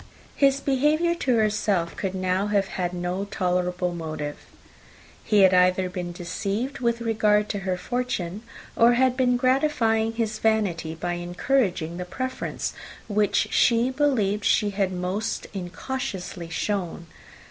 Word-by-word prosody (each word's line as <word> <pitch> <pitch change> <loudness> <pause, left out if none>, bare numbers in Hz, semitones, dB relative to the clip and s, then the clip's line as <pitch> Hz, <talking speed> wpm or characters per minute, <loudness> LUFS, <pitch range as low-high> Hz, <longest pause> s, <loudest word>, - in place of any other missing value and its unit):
His 275 -1 +3
behaviour 300 +6 +2
to 270 -7 0
herself 205 -5 +1
could 190 -1 -3
now 185 +2 0
have 200 -2 +1
had 180 -2 -2
no 180 +2 -3
tolerable 180 -2 -1
motive: 155 -3 -5 0.9
he 210 -1 +3
had 190 -1 +6
either 185 0 +3
been 180 -1 -4
deceived 200 +9 -3
with 235 -1 0
regard 210 -2 +2
to 205 - -2
her 190 -2 -2
fortune, 215 -5 -3 0.3
or 235 +1 +6
had 255 +1 +3
been 250 -1 +2
gratifying 245 -4 +2
his 225 -1 -2
vanity 195 -8 0
by 175 +2 -3
encouraging 175 -1 -1
the 180 - -4
preference 255 +7 -4 0.3
which 210 -2 +1
she 235 +2 +3
believed 235 -8 +1
she 205 0 +2
had 195 -1 0
most 185 +4 -2
incautiously 185 -2 -5
shown. 175 -2 -2
205 Hz, 135 wpm, -25 LUFS, 180-235 Hz, 0.9 s, had